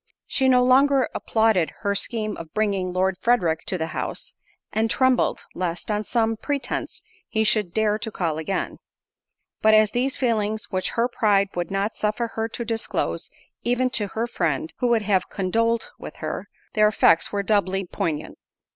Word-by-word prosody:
She 265 -1 +2
no 250 -1 +5
longer 265 +1 +4
applauded 220 -7 +1
her 200 -2 +1
scheme 215 +1 -1
of 165 -1 -10
bringing 200 -4 0
Lord 185 0 0
Frederick 180 -10 +2
to 185 - -1
the 160 - -1
house, - - -3 0.4
and 220 +1 +1
trembled, 260 0 +2
lest, 180 +3 -3
on 210 0 0
some 225 -1 0
pretence, 280 +4 -3 0.3
he 220 - +1
should 210 -4 +3
dare 215 +1 +1
to 220 - -3
call 165 -7 -2
again. 175 +5 -3 0.8
But 220 0 +6
as 215 -1 +5
these 255 +2 0
were 265 - 0
feelings 220 -1 0
which 185 -1 0
her 235 +1 +3
pride 210 -5 +2
would 175 -1 -3
not 195 +3 -1
suffer 215 +2 -1
her 225 0 -2
to 235 +1 -5
disclose 225 0 -2 0.3
even 250 +1 +1
to 210 -4 0
her 225 +4 -2
friend, 160 - -2
who 250 - +1
would 230 -2 +2
have 190 -3 +1
condoled 230 +4 0
with - - -8
her, - - -5 0.3
their 215 -1 +5
effects 185 -5 +3
were 200 -1 -1
doubly 195 -2 +1
poignant. 155 -3 -3
215 Hz, 175 wpm, -24 LUFS, 190-235 Hz, 0.8 s, But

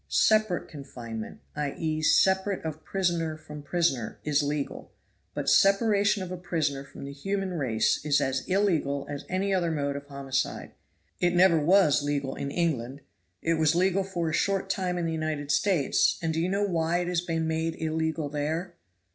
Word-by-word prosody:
Separate 215 -5 +2
confinement, 120 -7 -8
i.e., 155 +2 -2
separation 190 +3 +3
of 155 0 -5
prisoner 170 -5 -1
from 150 -1 -10
prisoner, 145 -6 -1
is 150 -1 +2
legal, 145 0 -3 0.4
but - - -3
separation 200 0 +4
of 180 - -7
a 180 - -4
prisoner 160 -6 -2
from 140 - -10
the 140 - -6
human 195 +6 -3
race 125 -9 +1
is 145 -1 +3
as 130 0 -1
illegal 165 -8 +1
as 145 -1 -6
any 195 +2 0
other 175 -3 +1
mode 145 -3 -1
of 140 0 -7
homicide. 140 -1 -3 0.5
It 175 0 +2
never 175 -2 +5
was 155 -2 +4
legal 145 -2 -2
in 140 - -4
England; 140 -5 -1 0.4
it 165 -1 +1
was 155 0 +3
legal 190 +2 +2
for 180 -3 -3
a 160 - -2
short 195 +3 0
time 180 -2 -1
in 175 - -1
the 165 - -1
United 155 -2 -2
States, 165 -2 +2
and 165 -1 -1
do 160 - 0
you 175 - 0
know 200 +2 +1
why 170 -2 0
it 175 - -3
has 175 -1 0
been 165 -2 -2
made 160 0 -1
illegal 160 -1 -1
there?" 160 +5 -3
160 Hz, 175 wpm, -27 LUFS, 145-180 Hz, 0.5 s, never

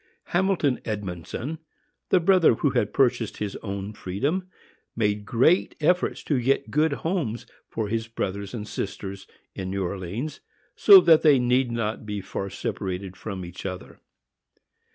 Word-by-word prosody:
Hamilton 175 -7 +2
Edmondson, 105 - -5 0.5
the 185 - +5
brother 175 -6 +5
who - - +1
had 105 - 0
purchased 120 -4 +1
his 105 -2 -4
own 100 0 -5
freedom, 140 - -2 0.5
made 105 -2 0
great 130 +10 +3
efforts 180 +4 +1
to 140 -5 0
get 135 +3 +1
good 155 +2 +2
homes 155 - -1 0.2
for 110 -2 -3
his 115 +1 -2
brothers 100 -1 -4
and 105 -2 -5
sisters 100 -1 -5 0.3
in 95 -1 -5
New 95 0 -2
Orleans, 100 - -4 0.4
so 200 -3 +9
that 165 -3 +6
they 150 -3 +6
need 125 0 +2
not 115 -2 -2
be 105 -1 -3
far 100 0 -5
separated 95 0 -4
from 95 -2 -6
each 85 +1 -9
other. 95 -1 -7
115 Hz, 145 wpm, -25 LUFS, 100-150 Hz, 0.5 s, so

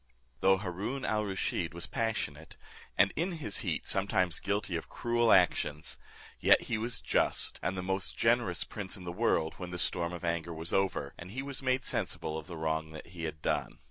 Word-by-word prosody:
Though 95 0 +5
Haroon 100 +8 -3
al 105 0 +1
Rusheed 95 -4 -2
was 85 - -5
passionate, 80 -10 -3 0.4
and 100 +1 +5
in 175 +4 0
his 145 -11 -3
heat - - -2
sometimes 95 -3 +2
guilty 100 -2 -1
of 80 - -4
cruel 120 -1 +2
actions; 80 -4 +3 0.4
yet - - +6
he 115 - -1
was 115 +1 -1
just, - - +2
and 95 +1 -1
the 90 - -2
most 95 +1 -1
generous 115 -6 +2
prince 100 -1 -5
in 95 - -10
the 85 - -4
world, 85 -5 +1
when 90 -2 -6
the 90 - -4
storm 85 -1 0
of 85 0 -5
anger 85 0 -1
was 80 +1 -4
over, 95 -7 +1
and 85 - -8
he 130 +7 -4
was 140 -1 -4
made 130 0 +1
sensible 80 - -1
of 80 -1 -5
the 85 - -7
wrong 80 0 -2
he 85 -1 -6
had 75 -1 -6
done. - - -1
95 Hz, 195 wpm, -32 LUFS, 85-110 Hz, 0.4 s, yet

